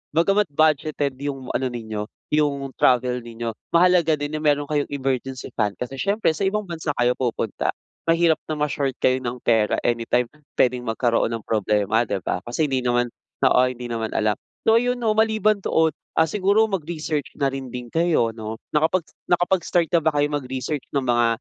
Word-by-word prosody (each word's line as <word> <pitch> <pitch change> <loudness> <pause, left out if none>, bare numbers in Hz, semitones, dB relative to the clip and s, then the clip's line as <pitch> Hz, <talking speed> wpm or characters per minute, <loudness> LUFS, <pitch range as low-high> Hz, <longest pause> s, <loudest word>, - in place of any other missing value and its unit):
bagamat 195 +5 +3
budgeted 150 -1 +1
yung 135 -2 -4
ano 130 - 0
ninyo 110 -3 -5 0.2
yung 145 -2 +1
travel 125 0 +3
ninyo 115 0 -5 0.2
mahalaga 170 -1 +5
din 145 +1 -3
yung 155 - -5
meron 145 -1 +3
kayong 150 -1 0
emergency 135 -2 -3
fund 105 -3 0
kasi 130 +2 -5
siyempre 200 +1 +1
sa 175 +5 -2
ibang 210 +2 0
bansa 165 -4 -3
kayo 120 0 +3
pupunta. 120 -4 -1 0.3
Mahirap 165 -1 +4
na 155 - -2
ma-short 145 -3 -1
kayo 130 0 +2
ng 125 0 -4
pera 110 -2 +3
anytime 120 +1 +1 0.3
pwedeng 125 -1 +3
magkaroon 115 0 +1
ng 115 - -7
problema 105 +1 +1
'di 100 -2 -2
ba? - - -1
Kasi 135 +6 0
hindi 135 -3 0
naman 120 0 +1 0.4
oo 125 - +5
hindi 125 -1 -7
naman 115 -2 -3
alam, 105 -1 +2 0.3
so 225 - +6
yun 245 0 0
'no, 220 -2 +2
maliban 215 -2 +2
doon, 160 -2 +2 0.3
ah, - - +6
siguro 200 +4 +3
mag-research 160 -6 -3
na 140 - +3
rin 135 -1 -5
din 125 0 -6
kayo 165 -8 +2
'no? 110 0 -6 0.2
Nakapag 160 +3 +2 0.2
nakapag-start 175 -1 +2
na 170 - +5
ba 160 - +4
kayo 145 0 +2
mag-research 130 +1 -3
ng 140 -2 0
mga 120 -1 +3
140 Hz, 175 wpm, -23 LUFS, 120-165 Hz, 0.4 s, so